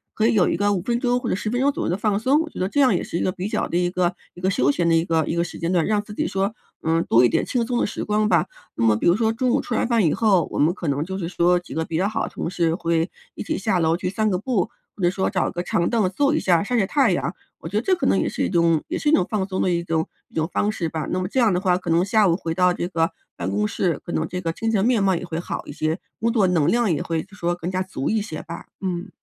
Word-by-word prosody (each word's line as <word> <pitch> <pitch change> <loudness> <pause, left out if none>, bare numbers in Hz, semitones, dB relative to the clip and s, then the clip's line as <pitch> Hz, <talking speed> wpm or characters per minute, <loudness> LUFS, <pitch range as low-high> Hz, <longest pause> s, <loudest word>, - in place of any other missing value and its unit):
可 220 - +1
以 - - +2
有 200 -5 +4
一 - - 0
个 205 +2 +2
5 185 - -1
分 235 +5 -1
钟 245 0 +1
或 245 -2 -4
者 - - +1
10 215 +2 -3
分 245 +1 0
钟 280 +2 +3
左 - - -4
右 - - -1
的 - - +1
放 205 0 0
松， 270 +7 +3
我 325 - -4
觉 - - -13
得 185 - +1
这 285 +8 +1
样 255 -8 +4
也 - - -1
是 - - -7
一 - - -1
个 185 - +1
比 185 +1 -4
较 - - -1
的 170 - -1
一 175 0 +1
个 180 -1 0 0.2
一 175 - -12
个 185 - +1
休 180 - +2
闲 170 +3 0
的 165 - +4
一 165 0 +2
个 165 -2 +1
一 - - -1
个 170 - +1
时 175 - -8
间 170 +1 -1
段， 175 -4 +2
让 210 -1 +1
自 210 - -10
己 - - -1
说， 195 +2 -1 0.3
嗯， 165 +1 +2
多 120 +2 +6
一 - - +4
点 - - +1
轻 240 -2 0
松 245 +1 -1
的 - - +2
时 - - -4
光 210 0 +1
吧。 - - +3 0.3
那 115 - -1
么 110 -1 +5
比 105 - 0
如 175 - +5
说 220 +1 +1
中 250 +2 0
午 - - +3
吃 - - -5
完 - - +1
饭 230 -5 +2
以 155 - +3
后， 195 -7 +3
我 - - -4
们 150 +3 +4
可 175 - -6
能 140 +1 0
就 190 +3 -5
是 170 - -3
说 175 0 +2
几 175 -5 -11
个 160 - 0
比 160 - -3
较 190 +4 +1
好 220 +1 -2
的 - - -7
同 - - -5
事 170 -2 +1
会 165 -1 0 0.3
一 - - -7
起 - - -2
下 195 -2 0
楼 165 0 +2
去 180 - -3
散 215 +3 0
个 185 - +1
步， 205 -2 -1 0.3
或 - - -10
者 175 - +5
说 190 +1 -1
找 - - 0
个 175 -1 -3
长 170 -1 0
凳 225 -5 +2
坐 285 +8 +2
一 - - +2
下 175 -2 +2
晒 245 +4 -1
晒 205 - +3
太 260 +1 +2
阳， 175 0 -1 0.3
我 - - -8
觉 185 - -7
得 - - +2
这 375 - +3
可 350 - -3
能 - - +3
也 - - 0
是 - - -2
一 - - 0
种 170 -3 +2
也 - - -1
是 300 - +1
一 - - +3
种 315 - +4
放 200 -3 -1
松 185 -1 -3
的 185 - +1
一 170 0 0
种 165 -2 -1 0.2
一 - - -22
种 160 0 0
方 210 - +1
式 175 -6 -3
吧， 160 -1 -4
那 185 - -1
么 185 - -2
这 260 - -1
样 230 -4 +4
的 180 - +1
话 180 -2 +2
可 - - -6
能 170 +2 +3
下 210 0 +3
午 170 - +3
回 165 -4 -3
到 180 +1 +3
这 175 0 -2
个 165 -2 0 0.3
办 90 +1 -3
公 105 +2 0
室， 175 - -1
可 - - -6
能 160 -1 -1
这 180 - -4
个 165 -2 -1
精 225 +5 -2
神 205 -2 +2
面 240 -3 +3
貌 190 -1 +3
也 175 - -4
会 165 -2 -4
好 175 - -5
一 - - -8
些， 155 +2 -1 0.2
工 230 +1 +1
作 220 -4 +3
能 170 -5 +2
量 235 -5 +2
也 - - -1
会 165 -1 -2
就 205 +1 -17
说 175 -3 -1
更 175 +1 -5
加 185 0 -1
足 185 -8 -3
一 220 -1 +1
些 160 -7 -6
吧， 170 +1 -8 0.2
嗯。 185 0 -3
185 Hz, 360 characters per minute, -23 LUFS, 170-215 Hz, 0.3 s, 多